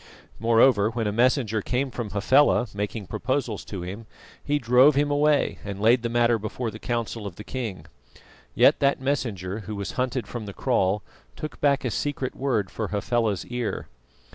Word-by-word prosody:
Moreover, 115 Hz, -1 st, +4 dB
when 115 Hz, -1 st, -2 dB
a 105 Hz, -, 0 dB
messenger 115 Hz, -1 st, +2 dB
came 130 Hz, +5 st, -1 dB
from 115 Hz, -3 st, -4 dB
Hafela, 125 Hz, +6 st, +3 dB
making 105 Hz, +1 st, -4 dB
proposals 125 Hz, -1 st, -2 dB
to 95 Hz, -4 st, -6 dB
him, 100 Hz, +5 st, -7 dB, 0.4 s
he 145 Hz, 0 st, +1 dB
drove 125 Hz, +3 st, +5 dB
him 145 Hz, +1 st, +2 dB
away 145 Hz, 0 st, +2 dB
and 100 Hz, -1 st, -6 dB
laid 115 Hz, +4 st, +4 dB
the 115 Hz, -, -2 dB
matter 120 Hz, -1 st, +2 dB
before 110 Hz, +2 st, -4 dB
the 110 Hz, -, -10 dB
council 115 Hz, -3 st, -3 dB
of 90 Hz, -, -8 dB
the 105 Hz, -, -9 dB
king. 105 Hz, -11 st, -5 dB, 0.7 s
Yet -, -, +5 dB
that 140 Hz, 0 st, +2 dB
messenger, 115 Hz, -8 st, -2 dB
who 105 Hz, 0 st, -6 dB
was 100 Hz, -3 st, -4 dB
hunted 125 Hz, 0 st, -2 dB
from 110 Hz, 0 st, -6 dB
the 100 Hz, -, -6 dB
kraal, 105 Hz, -5 st, +1 dB, 0.3 s
took 155 Hz, -, -7 dB
back 140 Hz, -1 st, +2 dB
a 125 Hz, -, 0 dB
secret 135 Hz, +2 st, -2 dB
word 120 Hz, -8 st, -1 dB
for 110 Hz, -, -3 dB
Hafela's 105 Hz, -1 st, -1 dB
ear. 120 Hz, -2 st, -4 dB
115 Hz, 175 wpm, -25 LUFS, 105-130 Hz, 0.7 s, drove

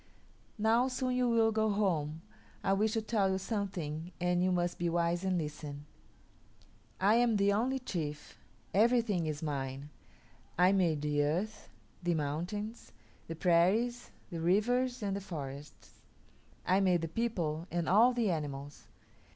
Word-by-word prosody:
"Now, 225 Hz, +4 st, +3 dB
soon 255 Hz, -1 st, -1 dB
you 250 Hz, -1 st, +2 dB
will 225 Hz, -1 st, +3 dB
go 220 Hz, 0 st, +1 dB
home. 165 Hz, -7 st, 0 dB, 0.4 s
I 195 Hz, -, +2 dB
wish 215 Hz, +2 st, +1 dB
to 225 Hz, -, -1 dB
tell 210 Hz, -3 st, +1 dB
you 190 Hz, -, +1 dB
something 185 Hz, -6 st, -4 dB
and 180 Hz, 0 st, +1 dB
you 185 Hz, -, +2 dB
must 175 Hz, -1 st, -1 dB
be 175 Hz, 0 st, 0 dB
wise 170 Hz, +1 st, 0 dB
and 190 Hz, -1 st, +1 dB
listen. 150 Hz, -2 st, -5 dB, 1.1 s
I 200 Hz, +3 st, +4 dB
am 240 Hz, -2 st, +3 dB
the 200 Hz, 0 st, +3 dB
only 250 Hz, +6 st, +1 dB
chief; 160 Hz, -, -5 dB, 0.3 s
everything 215 Hz, -5 st, +3 dB
is 155 Hz, 0 st, -4 dB
mine; 140 Hz, -1 st, -4 dB, 0.7 s
I 180 Hz, +2 st, +5 dB
made 170 Hz, -6 st, +1 dB
the 145 Hz, -1 st, +1 dB
earth, 180 Hz, +9 st, -2 dB, 0.3 s
the 175 Hz, -1 st, 0 dB
mountains, 175 Hz, +10 st, -4 dB, 0.3 s
the 165 Hz, -, -5 dB
prairies, 190 Hz, +9 st, +2 dB, 0.2 s
the 170 Hz, -, -4 dB
rivers, 245 Hz, +7 st, +1 dB
and 200 Hz, -1 st, -1 dB
the 200 Hz, -, -4 dB
forests; 145 Hz, -6 st, -8 dB, 0.6 s
I 185 Hz, +2 st, +3 dB
made 180 Hz, -3 st, +3 dB
the -, -, -1 dB
people 170 Hz, -5 st, -2 dB
and 170 Hz, -1 st, -2 dB
all 225 Hz, +7 st, +6 dB
the 235 Hz, -5 st, +1 dB
animals. 145 Hz, -3 st, -5 dB
185 Hz, 150 wpm, -32 LUFS, 160-220 Hz, 1.1 s, all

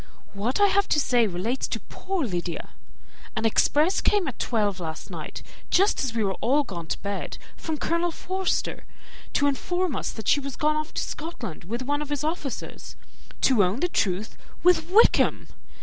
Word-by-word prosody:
What 215 Hz, -, -1 dB
I 410 Hz, -, +7 dB
have 400 Hz, 0 st, +3 dB
to 300 Hz, -, +3 dB
say 245 Hz, -5 st, +3 dB
relates 205 Hz, +8 st, -2 dB
to -, -, -3 dB
poor 370 Hz, -5 st, -3 dB
Lydia. 175 Hz, -5 st, -3 dB, 0.7 s
An 220 Hz, -, -1 dB
express 300 Hz, -, +3 dB
came 410 Hz, -5 st, +3 dB
at 260 Hz, -, -5 dB
twelve 205 Hz, -5 st, 0 dB
last 160 Hz, -2 st, -6 dB
night, -, -, -6 dB, 0.3 s
just 390 Hz, -1 st, +3 dB
as 240 Hz, -4 st, -2 dB
we 225 Hz, -, +1 dB
were 195 Hz, -1 st, +1 dB
all 280 Hz, +5 st, +3 dB
gone 175 Hz, -, -7 dB
to -, -, -1 dB
bed, 200 Hz, 0 st, -3 dB, 0.2 s
from 315 Hz, -2 st, -4 dB
Colonel 335 Hz, +3 st, +1 dB
Forster, 375 Hz, +3 st, -2 dB, 0.5 s
to 285 Hz, -, +3 dB
inform 350 Hz, +4 st, 0 dB
us -, -, -2 dB
that 220 Hz, -3 st, -8 dB
she 290 Hz, -, +5 dB
was 275 Hz, -2 st, -5 dB
gone 305 Hz, 0 st, +2 dB
off 305 Hz, +1 st, -2 dB
to -, -, 0 dB
Scotland 245 Hz, -, -6 dB
with 235 Hz, +7 st, -3 dB
one 290 Hz, +3 st, 0 dB
of 300 Hz, -, -5 dB
his 290 Hz, -1 st, -1 dB
officers; 305 Hz, -4 st, -4 dB, 0.5 s
to 245 Hz, -6 st, +5 dB
own 185 Hz, +7 st, 0 dB
the 355 Hz, -, +3 dB
truth, 200 Hz, -, 0 dB, 0.3 s
with 355 Hz, -2 st, +4 dB
Wickham! 425 Hz, +5 st, +4 dB
275 Hz, 180 wpm, -26 LUFS, 210-330 Hz, 0.7 s, I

